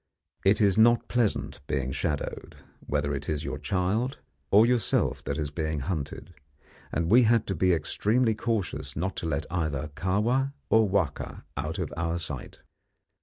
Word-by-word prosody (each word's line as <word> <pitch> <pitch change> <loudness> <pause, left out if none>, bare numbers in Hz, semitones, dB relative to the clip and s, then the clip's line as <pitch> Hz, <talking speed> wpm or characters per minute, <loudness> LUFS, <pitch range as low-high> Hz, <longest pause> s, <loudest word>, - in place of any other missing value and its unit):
It 100 +2 +4
is 100 0 +4
not 120 +1 +5
pleasant 120 -4 0
being 65 -1 -1
shadowed, 75 +1 -3 0.3
whether 70 0 0
it 70 +1 -4
is 75 -1 -1
your - - -4
child 105 +8 0 0.3
or 105 +3 +7
yourself 120 -3 +1
that - - -2
is 75 -2 -2
being 80 -2 -2
hunted, 85 +2 -4 0.6
and 85 +3 -1
we 125 +3 +8
had 115 -1 +3
to 95 - -2
be 90 +3 +3
extremely 110 - +2
cautious 110 -3 -2
not 90 +5 -2
to 85 - -2
let 80 0 -1
either 80 -4 -1
Kahwa 115 - +1 0.2
or 110 -2 +5
Wahka 95 -7 -1
out 75 +3 -3
of - - -3
our 85 0 -1
sight. 75 -6 -6
90 Hz, 160 wpm, -27 LUFS, 75-110 Hz, 0.6 s, we